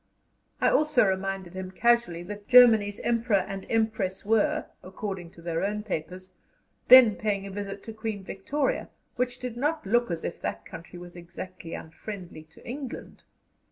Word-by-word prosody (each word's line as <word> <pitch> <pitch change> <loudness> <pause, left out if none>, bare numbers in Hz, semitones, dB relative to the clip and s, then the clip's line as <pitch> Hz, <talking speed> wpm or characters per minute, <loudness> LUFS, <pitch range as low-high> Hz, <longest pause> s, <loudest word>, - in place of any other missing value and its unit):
I - - +3
also 305 -6 +4
reminded 190 -1 -2
him 185 0 -5
casually 225 -4 +1
that 205 +2 -9
Germany's 220 -5 +6
Emperor 230 -5 +1
and 195 -1 -6
Empress 215 -4 -1
were, 220 0 +2 0.2
according 190 -2 -6
to 170 - -15
their 165 0 -2
own 210 +1 -2
papers, 185 -1 -5 0.5
then 250 -5 +9
paying 200 -2 -2
a 200 - -7
visit 200 0 -6
to 225 - -8
Queen 220 -2 -5
Victoria, 265 +10 -2 0.3
which 250 0 -1
did 250 -2 -6
not 300 +4 -1
look 240 +3 +2
as 170 -2 -3
if - - -5
that - - -4
country 170 +2 -10
was 175 0 -11
exactly 175 0 -8
unfriendly 180 0 -8
to 160 - -18
England. 260 0 -7
200 Hz, 160 wpm, -27 LUFS, 185-230 Hz, 0.5 s, then